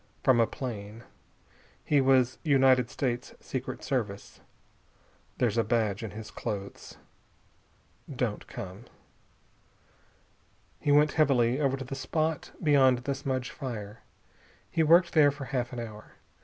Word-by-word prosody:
From 130 -3 +4
a 115 - +4
plane. 110 -4 -7 0.8
He 145 -2 +3
was 130 -1 +3
United 130 -5 +4
States 125 -2 -3
Secret 130 -1 -5
Service. 110 -7 -3 1.0
There's 115 -2 +1
a - - +3
badge 110 -3 0
in 110 - -5
his 110 +2 -9
clothes. 100 -1 -6 1.1
Don't - - -3
come." 95 +5 -8 1.9
He 145 - 0
went 150 +1 +5
heavily 130 -5 +2
over 135 -1 +1
to 135 - -6
the 135 - -7
spot 155 +3 -2
beyond 135 -4 +5
the 140 - -1
smudge 130 -2 -3
fire. 115 -6 -6 0.7
He 165 - +1
worked 170 +3 +5
there 150 -3 +6
for 145 -1 -6
half 125 -3 -2
an 125 - -5
hour. 110 -2 -9
130 Hz, 130 wpm, -28 LUFS, 115-140 Hz, 1.9 s, there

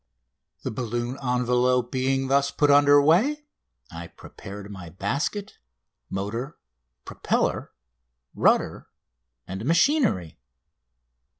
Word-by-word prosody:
The - - -3
balloon 120 +2 -3
envelope 125 -1 +1
being 135 0 0
thus 140 +1 +2
put 145 0 +2
under 145 0 +6
way 225 - +2 0.5
I 85 0 -8
prepared 100 +3 -11
my 95 -4 -9
basket, 130 - -3 0.5
motor, 115 +9 -4 0.5
propeller, - - -1 0.6
rudder, - - +1 0.6
and 95 +3 -6
machinery. 165 - +1
125 Hz, 90 wpm, -25 LUFS, 105-145 Hz, 0.6 s, under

